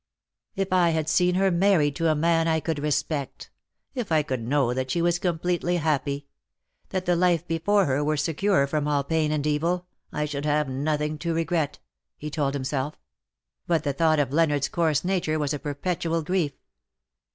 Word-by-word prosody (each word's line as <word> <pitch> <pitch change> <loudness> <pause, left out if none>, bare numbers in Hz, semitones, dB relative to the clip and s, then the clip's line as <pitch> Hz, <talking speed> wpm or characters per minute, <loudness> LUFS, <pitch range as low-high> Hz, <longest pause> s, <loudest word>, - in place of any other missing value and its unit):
" - - -64
If 195 -2 -1
I 180 -2 +4
had 160 -2 0
seen 180 +3 +3
her 190 0 +3
married 170 -5 +3
to 165 -1 +2
a 155 - +3
man 165 +1 +2
I 160 -1 +2
could 160 -1 -2
respect; 145 -1 -2 0.4
if 245 -9 -4
I 155 -1 +3
could 130 -4 -3
know 125 +1 +1
that 130 +1 -2
she 170 - 0
was 175 +1 +2
completely 175 0 0
happy; 145 -3 -1 0.6
that 185 -1 -2
the 175 -1 +2
life 175 -1 +2
before 185 +5 +2
her 140 +1 0
were 155 +1 0
secure 165 +1 +2
from 150 +1 -1
all 145 -1 +1
pain 155 +1 0
and 150 -1 -1
evil, 165 +4 0 0.3
I 150 - -1
should 145 -1 -4
have 150 0 +1
nothing 150 +3 -1
to 170 0 -2
regret,^^ 165 -2 -1 0.4
he 150 +1 -6
told 145 -2 -1
himself; 135 +1 -2 0.7
but 165 -3 +1
the 140 -2 -1
thought 160 +2 +3
of 140 -3 +1
Leonardos 150 -3 +2
coarse 160 -2 +1
nature 175 -4 0
was 150 -1 -1
a 145 - -3
perpetual 165 +3 -2
grief. 165 -3 0
155 Hz, 185 wpm, -25 LUFS, 145-170 Hz, 0.7 s, I